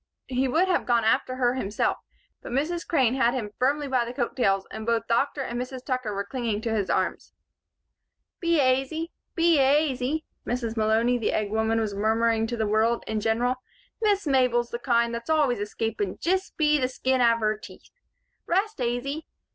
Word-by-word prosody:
He 260 +1 +1
would 330 +8 +2
have 365 - 0
gone 235 -2 +3
after 225 +3 +1
her 250 -1 +2
himself, 215 -5 -1 0.4
but - - -8
Mrs. 310 +7 -1
Crane 260 -7 +2
had 260 -2 +2
him 215 -5 -3
firmly 285 +3 +1
by 255 -3 +1
the 240 +1 -7
coat 240 -4 -2
tails 195 -6 +1
and 220 +2 -6
both 230 0 0
Dr. 275 +5 +1
and 240 -1 -3
Mrs. 255 0 -7
Tucker 255 -5 -2
were 200 0 -2
clinging 230 -3 -2
to 225 0 -2
his 205 -3 -1
arms. - - -1 1.1
"Be 335 -2 +2
aisy, 270 +5 +1 0.2
be 335 -2 +4
aisy," 280 +1 +2 0.2
Mrs. 235 -2 -3
Malony, 225 +3 +2
the 225 - 0
egg 210 -1 -1
woman 220 +1 +1
was 215 -2 -2
murmuring 225 +2 +1
to 240 +1 -4
the 220 - 0
world 220 +3 +1
in 220 -1 -2
general. 240 +4 +1 0.4
"Miss 410 -3 +2
Mabel's 250 -4 +2
the 235 - -3
kind 235 -2 +1
thot's 235 +5 -6
always 290 -8 +2
escapin' 210 -1 -3
jist 375 +3 -1
be 300 -1 +3
the 255 - +1
skin 260 0 0
av 230 -1 +4
her 215 -1 +1
teeth. 215 - -14 0.6
Rest 390 -1 0
aisy. 250 +6 -2
245 Hz, 185 wpm, -26 LUFS, 225-275 Hz, 1.1 s, be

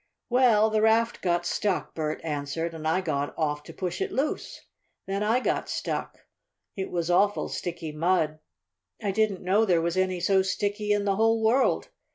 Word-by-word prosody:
"Well, 230 -4 +4
the 215 0 +2
raft 225 +1 +2
got 175 -1 0
stuck," 195 +1 -1
Bert 155 -1 -3
answered, 155 +2 -3
"and 155 -1 -5
I 165 +4 +2
got 145 -5 -2
off 150 -2 -1
to - - -9
push 180 -2 -4
it - - -1
loose. 280 +4 -2 0.4
Then 195 +1 -2
I 220 +4 +2
got - - -1
stuck. - - -4 0.5
It 190 -1 -4
was 175 -1 -1
awful 200 +3 +2
sticky 170 -2 -4
mud. 155 -1 +1 0.6
I 200 - -1
didn't 210 -2 0
know 195 +4 +3
there 180 -6 +3
was 170 +2 -1
any 185 -1 +1
so 190 +2 +3
sticky 205 +2 -1
in 205 -1 +2
the 195 -1 +1
whole 225 0 +3
world! 240 +5 +2
185 Hz, 180 wpm, -27 LUFS, 165-210 Hz, 0.6 s, Well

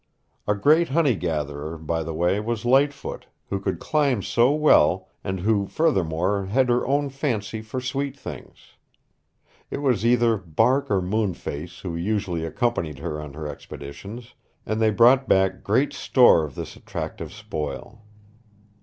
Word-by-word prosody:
A 105 - +2
great 155 +11 +4
honey 145 -2 +3
gatherer, 75 -2 -3
by 80 +1 -2
the 80 0 -5
way, 90 +5 +1
was 115 +1 -3
Lightfoot, 140 +3 +1 0.2
who 100 - 0
could 95 - -2
climb 140 - +1
so 120 +7 +3
well, 150 - +4 0.2
and 95 -1 -3
who, 100 0 +1
furthermore, 95 - 0
had 125 +5 +2
her 120 0 +1
own 140 +1 +1
fancy 115 -6 -3
for 110 +4 -5
sweet 135 +2 -3
things. - - -10 1.0
It - - -4
was 125 -7 +2
either 120 -1 +3
Bark 110 - +1
or 95 -3 +1
Moonface 90 -5 -3
who 85 -3 -4
usually 90 -2 -1
accompanied 80 - -1
her 75 0 -4
on 75 -2 -9
her 75 0 -6
expeditions, 100 - -9 0.3
and 110 0 -2
they 110 - +4
brought 120 +5 +5
back 95 -1 +2
great 130 +8 +1
store 120 - +5
of 70 - -10
this - - -6
attractive - - -6
spoil. 80 +8 -6
105 Hz, 150 wpm, -24 LUFS, 85-130 Hz, 1.0 s, brought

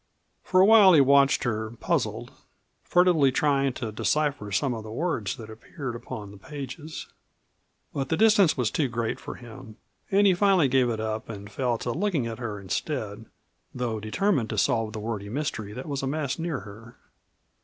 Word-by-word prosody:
For 185 - +2
a 190 - +8
while 210 -3 +8
he 155 - +7
watched 140 0 +4
her, 110 -3 -2
puzzled, 120 -7 -1 0.5
furtively 175 -6 +4
trying 140 -1 +1
to 120 -3 -5
decipher 140 -2 -1
some 125 +6 +1
of 115 - -5
the 110 - -10
words 115 - -2
that 115 -3 -9
appeared 120 +4 -7
upon 105 -3 -7
the 100 - -13
pages. 145 - -7 0.9
But 135 -1 -3
the 160 - +1
distance 210 -7 +5
was 125 -4 0
too 145 - +1
great 115 -2 -3
for - - -7
him 110 -2 -12 0.3
and 200 +1 +4
he 195 - +6
finally 185 -4 +4
gave 130 -1 +3
it 115 -2 -2
up 110 0 -3
and 100 -2 -8
fell 125 -2 -1
to 120 - -3
looking 170 - 0
at 115 0 -5
her 110 -4 -4
instead, 105 +2 -4 0.5
though 120 -3 -2
determined 115 - 0
to 110 - -4
solve 110 +1 +1
the 110 - -5
wordy 105 -2 -4
mystery 110 -5 -3
that 130 - -7
was 140 -2 -3
massed 140 +1 -2
near 160 - -3
her. 110 +4 -13
125 Hz, 180 wpm, -26 LUFS, 110-150 Hz, 0.9 s, a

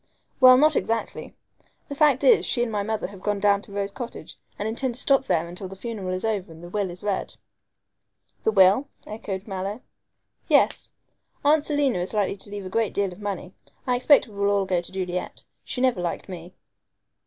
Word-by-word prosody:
"Well, 255 -1 +9
not 300 +2 +4
exactly. 225 0 -2 0.5
The - - -6
fact 285 -2 +3
is, 475 -3 +6
she 240 - 0
and 235 - -3
my 210 -1 -1
mother 220 +1 -2
have 195 -1 -9
gone 205 0 -1
down 200 0 +3
to 205 - -14
Rose 200 0 -3
Cottage 240 +3 -8 0.2
and 210 - -3
intend 240 +2 -2
to - - -3
stop 275 -1 +3
there 165 0 +1
until 180 +3 -7
the 195 - -10
funeral 205 -2 -5
is 185 +3 -2
over 200 -5 -2
and 160 +1 -13
the 175 - -9
will 205 -2 -1
is 175 +1 -10
read." 200 -2 -2 1.1
"The 220 - +3
will?" 200 +7 +5 0.2
echoed 200 -3 -6
Mallow. 195 +3 -4 0.7
"Yes. - - +3 0.6
Aunt 300 +1 +4
Selina 285 - +1
is 180 +4 -4
likely 205 -1 0
to 200 - -11
leave 205 -1 -6
a - - -4
great 225 +2 -1
deal 200 -2 0
of 180 - -12
money. 195 -2 -5 0.3
I 250 - +1
expect 275 +3 +5
it 225 - -16
will 200 0 0
all 200 -1 +2
go 180 -2 0
to 175 - -9
Juliet. 180 -1 -4 0.2
She 250 - -5
never 255 -8 +2
liked 175 - -3
me." 180 -1 -9
205 Hz, 205 wpm, -25 LUFS, 190-240 Hz, 1.1 s, Well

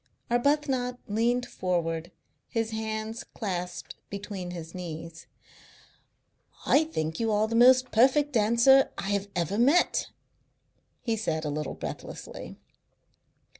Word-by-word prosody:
Arbuthnot 255 -1 +1
leaned 235 +4 +1
forward, 170 -2 -2 0.4
his 225 -1 -1
hands 220 0 -4
clasped 180 -5 -5 0.2
between 200 -2 -6
his 165 -2 -7
knees. 165 -2 -7 1.4
"I 310 +3 +4
think 160 - -3
you 225 -1 +1
are 210 +1 +2
the 225 - -4
most 255 +2 +6
perfect 270 +5 +4
dancer 235 +4 +5
I 195 - -3
have 200 0 0
ever 180 +4 -1
met," 285 +9 +3 0.9
he 230 -2 0
said 160 -8 -2
a - - -1
little 150 0 -3
breathlessly. - - -7
220 Hz, 115 wpm, -28 LUFS, 175-245 Hz, 1.4 s, most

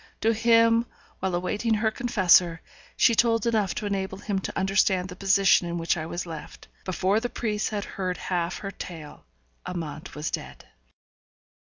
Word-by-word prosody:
To 225 +1 +3
him, 230 +1 +4 0.3
while 190 -1 -1
awaiting 210 +6 0
her 220 +1 +1
confessor, 185 -8 +3 0.3
she 235 - +5
told 230 -1 +2
enough 215 -5 +1
to - - -4
enable 195 -1 -2
him 200 -1 -2
to - - -5
understand 190 -1 +2
the 180 - -8
position 195 -2 +3
in 170 0 -3
which 165 0 +1
I 160 -1 -4
was 170 +2 -4
left; 160 -3 -9 0.2
before 190 +3 +1
the 245 +2 -3
priest 215 -4 -2
had 205 -2 -3
heard 185 -2 -3
half 175 -1 -2
her 195 - -3
tale 160 -6 -9 0.4
Amante 160 -1 -6
was 150 +1 -3
dead. - - -6
190 Hz, 165 wpm, -26 LUFS, 175-220 Hz, 0.4 s, she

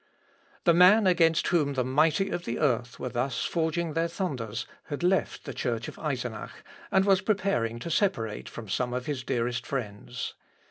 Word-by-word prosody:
] - - -32
The 170 - +5
man 185 +5 +7
against 165 -3 +3
whom 150 -5 +2
the 130 - +1
mighty 155 +9 +2
of 175 - -2
the 115 - -2
earth 125 -4 0
were 125 - -3
thus 125 0 -1
forging 165 0 -1
their 165 +1 +1
thunders 125 - -3 0.2
had 145 +3 -5
left 185 +2 +1
the - - -6
Church - - -2
of - - -9
Eisenach, - - -4 0.3
and 190 0 +4
was 195 -1 +4
preparing 195 - 0
to 145 +8 -5
separate 120 - 0
from 115 -2 -8
some 125 +5 -1
of 125 0 -3
his 145 -4 -2
dearest 120 0 -1
friends. 120 -2 -4
145 Hz, 180 wpm, -28 LUFS, 120-175 Hz, 0.3 s, man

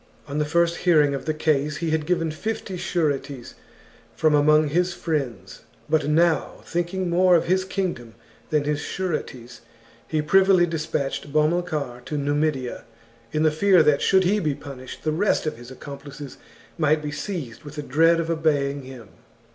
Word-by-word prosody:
On 145 +1 -3
the 150 - +1
first 170 +2 +1
hearing 155 -5 +3
of 135 -1 -4
the 155 - 0
case 150 -1 0
he 165 -1 -2
had 155 -1 -1
given 165 -3 0
fifty 205 +3 -4
sureties 145 -7 -2 0.6
from 155 -1 +2
among 150 +1 +4
his 175 +4 +1
friends, 125 - -4 0.3
but 155 -2 +1
now, 165 +2 +2
thinking 175 +2 -2
more 180 +1 +4
of 165 - +2
his 185 +2 +2
kingdom 180 - -4 0.3
than 150 -2 +1
his 150 0 -1
sureties, 140 -11 -5 0.5
he 155 - -1
privily 190 +2 +5
despatched 155 -3 -3
Bomilcar 155 -4 0
to 150 - -3
Numidia, 145 -2 -1 0.5
in 155 - 0
the 155 - +4
fear 180 +2 +4
that, 150 -2 +3
should 190 -1 +4
he 200 +4 +2
be 155 -7 -1
punished, 130 -2 -10
the 155 - 0
rest 185 +4 +1
of 155 -7 -3
his 120 +1 -12
accomplices 140 +1 -10 0.4
might 155 0 +2
be 150 - -3
seized 150 - -5
with 145 0 -10
a 150 - -3
dread 165 +5 +3
of 165 0 -1
obeying 145 -3 0
him. 130 -5 -11
155 Hz, 165 wpm, -24 LUFS, 140-170 Hz, 0.6 s, privily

